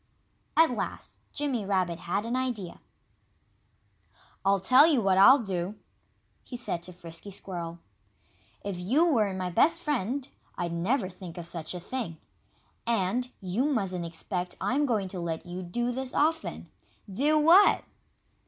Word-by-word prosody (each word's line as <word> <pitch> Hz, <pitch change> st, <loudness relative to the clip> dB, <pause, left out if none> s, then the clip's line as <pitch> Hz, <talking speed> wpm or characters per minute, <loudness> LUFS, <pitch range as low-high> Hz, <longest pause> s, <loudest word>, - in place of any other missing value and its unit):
At 325 Hz, -3 st, +6 dB
last 240 Hz, -, -5 dB
Jimmy 275 Hz, -7 st, -1 dB
Rabbit 185 Hz, -4 st, 0 dB
had 180 Hz, +5 st, -2 dB
an 235 Hz, +2 st, -2 dB
idea. 245 Hz, -8 st, -3 dB, 1.6 s
"I'll 195 Hz, 0 st, +3 dB
tell 255 Hz, -, +7 dB
you 300 Hz, -6 st, +3 dB
what 195 Hz, -3 st, +3 dB
I'll 255 Hz, +8 st, +9 dB
do," 195 Hz, -4 st, -3 dB, 0.7 s
he 245 Hz, -, -7 dB
said 205 Hz, -8 st, -3 dB
to 180 Hz, -, -7 dB
Frisky 170 Hz, +1 st, -8 dB
Squirrel. 175 Hz, -3 st, -5 dB, 0.9 s
"If 195 Hz, -3 st, -4 dB
you 255 Hz, -, +3 dB
weren't 215 Hz, -, +2 dB
my 180 Hz, -1 st, -2 dB
best 330 Hz, -, +3 dB
friend 275 Hz, -, -2 dB, 0.3 s
I'd 170 Hz, -1 st, -2 dB
never 185 Hz, +6 st, 0 dB
think 180 Hz, -2 st, -10 dB
of 175 Hz, -, -6 dB
such 170 Hz, 0 st, -5 dB
a -, -, -4 dB
thing. 195 Hz, -4 st, -5 dB, 0.7 s
And 235 Hz, +3 st, +1 dB
you 195 Hz, +8 st, 0 dB
mustn't 195 Hz, -, 0 dB
expect 180 Hz, +2 st, -4 dB
I'm 285 Hz, +3 st, +1 dB
going 215 Hz, -6 st, 0 dB
to 185 Hz, -, -5 dB
let 165 Hz, -1 st, -3 dB
you 180 Hz, +1 st, -6 dB
do 240 Hz, +8 st, -2 dB
this 260 Hz, +1 st, -3 dB
often 320 Hz, +2 st, 0 dB, 0.2 s
" 205 Hz, -, -18 dB
"Do 300 Hz, +3 st, +4 dB
what?" 335 Hz, +7 st, +6 dB
200 Hz, 150 wpm, -28 LUFS, 180-255 Hz, 1.6 s, I'll